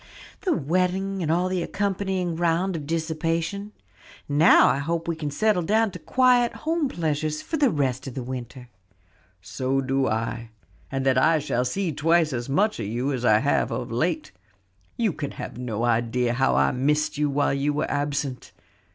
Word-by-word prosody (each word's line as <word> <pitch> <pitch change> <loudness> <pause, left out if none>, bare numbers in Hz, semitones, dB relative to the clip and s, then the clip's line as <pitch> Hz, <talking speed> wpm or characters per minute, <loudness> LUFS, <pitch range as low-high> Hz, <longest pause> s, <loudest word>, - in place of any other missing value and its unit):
"The 370 - +1
wedding 185 - 0
and 160 -2 0
all 175 +2 +2
the 185 -1 -1
accompanying 190 -2 -2
round 175 +2 0
of 150 -3 -5
dissipation. 165 +5 -2 0.6
Now 145 +4 +6
I - - +2
hope 165 +3 -2
we 170 - -1
can 155 -2 -4
settle 205 +5 +1
down 215 +5 +2
to - - -8
quiet 250 -2 +3
home 320 -3 +1
pleasures 155 - -2
for 320 - -3
the 285 -3 +4
rest 135 - -1
of 130 - -7
the 130 - -4
winter." 125 0 -7 0.8
"So 130 +8 -1
do 135 0 0
I, 115 +1 -2 0.4
and 135 0 -2
that 130 -1 +4
I 160 +5 +4
shall 125 -4 -1
see 180 +7 -1
twice 160 +1 +2
as 120 +1 -4
much 205 - +1
of 105 - -3
you 125 +6 -1
as 125 -2 -3
I 110 -3 +5
have 145 - +1
of 125 -2 -4
late. 180 - -1 0.7
You 225 -7 +1
can 145 -2 -5
have - - -7
no 115 -3 -3
idea 120 +1 +1
how 135 +2 +2
I - - +3
missed 150 +3 0
you 150 -1 +2
while 140 0 +1
you 140 +1 0
were 145 - -2
absent. 145 -2 -3
150 Hz, 180 wpm, -25 LUFS, 130-180 Hz, 0.8 s, Now